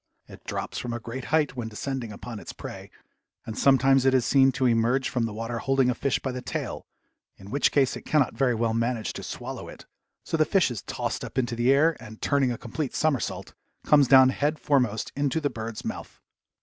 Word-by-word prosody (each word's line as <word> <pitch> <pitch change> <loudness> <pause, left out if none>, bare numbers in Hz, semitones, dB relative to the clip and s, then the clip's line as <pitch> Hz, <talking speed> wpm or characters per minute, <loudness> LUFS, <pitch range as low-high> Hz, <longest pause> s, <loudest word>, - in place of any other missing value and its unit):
It - - -14
drops - - -4
from 120 -1 -4
a 120 - -3
great 120 +3 -7
height 155 -3 +1
when 120 -3 -4
descending 120 +1 -4
upon 110 +2 -8
its - - -9
prey, - - -9 0.6
and 110 - -6
sometimes 135 0 +4
it 130 0 +4
is 125 -2 +2
seen 135 0 +5
to 130 - 0
emerge 120 +3 +2
from 120 -2 0
the - - -6
water 115 +2 -4
holding 135 0 +2
a - - 0
fish 130 +2 0
by 130 - -4
the 125 0 -5
tail, - - -5 0.5
in 95 - -12
which 140 +2 +2
case 135 -3 +2
it - - -7
cannot 150 -5 +1
very 125 +1 +1
well 115 0 0
manage 115 0 -1
to - - -7
swallow - - -7
it, - - -12 0.4
so 165 - -2
the 155 - +5
fish 185 -4 +2
is 110 -6 -5
tossed - - -4
up - - -8
into 120 -2 0
the 120 +3 +3
air 155 +4 +4
and, 110 0 -11
turning 140 -3 +1
a 120 - -3
complete 135 +5 -5
somersault, 155 -5 -1 0.3
comes 145 -3 +5
down 130 0 +7
head 145 +3 0
foremost 125 -8 0
into 140 +1 0
the 145 -2 -1
bird's 110 0 -6
mouth. - - -6
130 Hz, 215 wpm, -26 LUFS, 115-140 Hz, 0.6 s, down